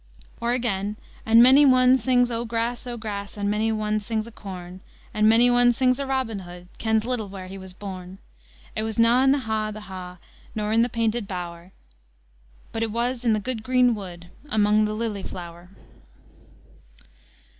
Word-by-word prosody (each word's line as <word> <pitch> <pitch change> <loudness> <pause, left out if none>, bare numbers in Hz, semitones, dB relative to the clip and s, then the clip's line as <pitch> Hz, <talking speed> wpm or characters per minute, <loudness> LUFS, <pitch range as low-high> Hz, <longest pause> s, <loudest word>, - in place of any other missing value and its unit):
Or 235 +1 +1
again, 210 -4 -1 0.3
"And 230 +1 +7
mony 265 +3 +7
ane 255 -2 +6
sings 245 0 +2
o' 230 0 -2
grass, 235 +1 -3
o' 240 -1 -5
grass, 205 -2 -6
And 205 0 -1
mony 215 +2 +1
ane 215 -1 0
sings 220 +1 -3
o' - - -10
corn; 185 -3 -9 0.3
An 215 0 +4
mony 230 +2 +6
ane 245 0 +4
sings 255 +1 +2
o' 280 - -2
Robin 260 -6 -1
Hood, 175 -1 -11
Kens 220 -1 +1
little 245 -4 -1
whare 190 -1 -8
he 190 +1 -8
was 190 -1 -10
born. 185 -2 -8 0.6
It - - -1
was 220 -1 -4
na 230 +2 +5
in 270 0 +5
the 280 0 +2
ha', 220 -2 -2
the 215 0 -8
ha', 185 -2 -9 0.4
Nor 210 -1 -2
in 225 +1 +4
the 240 - +2
painted 230 -1 -1
bower; 175 -1 -7 1.0
But 225 - -4
it 225 - 0
was 240 +2 -2
in 230 -2 +3
the 215 - +1
gude 230 +1 -3
green 250 +1 +3
wood, 175 -4 -8 0.2
Amang 215 -1 +3
the 210 - -2
lily 215 -2 -3
flower." 175 -1 -9
220 Hz, 185 wpm, -24 LUFS, 195-240 Hz, 1.0 s, And